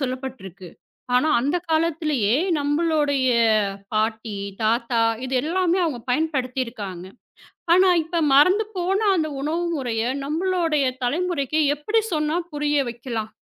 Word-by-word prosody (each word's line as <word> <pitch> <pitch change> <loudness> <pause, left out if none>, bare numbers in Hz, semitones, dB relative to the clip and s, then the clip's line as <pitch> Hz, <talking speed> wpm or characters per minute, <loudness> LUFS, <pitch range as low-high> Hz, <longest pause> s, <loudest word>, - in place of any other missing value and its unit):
சொல்லப்பட்ருக்கு. 250 - -6 0.5
ஆனா, 280 +5 +2
அந்தக் 325 +7 -1
காலத்திலேயே 310 -8 +1 0.3
நம்மளுடைய 290 -3 +1 0.7
பாட்டி, 220 0 -1 0.3
தாத்தா 235 +1 +1 0.3
இது 260 - -3
எல்லாமே 360 +2 +1
அவங்க 275 -7 -2
பயன்படுத்திருக்காங்க. 250 - -2 0.7
ஆனா 370 +1 +5
இப்ப 340 +2 -4
மறந்து 365 +10 +5
போன 370 +3 0 0.2
அந்த 315 -3 0
உணவு 310 +4 -1
முறைய 235 -6 -2 0.2
நம்மளோடய 325 -1 0 0.2
தலைமுறைக்கு 310 +1 -1 0.2
எப்படி 425 +10 0
சொன்னா 305 0 0 0.2
புரிய 295 0 0
வைக்கலாம்? 230 -2 -5
290 Hz, 105 wpm, -23 LUFS, 245-325 Hz, 0.7 s, ஆனா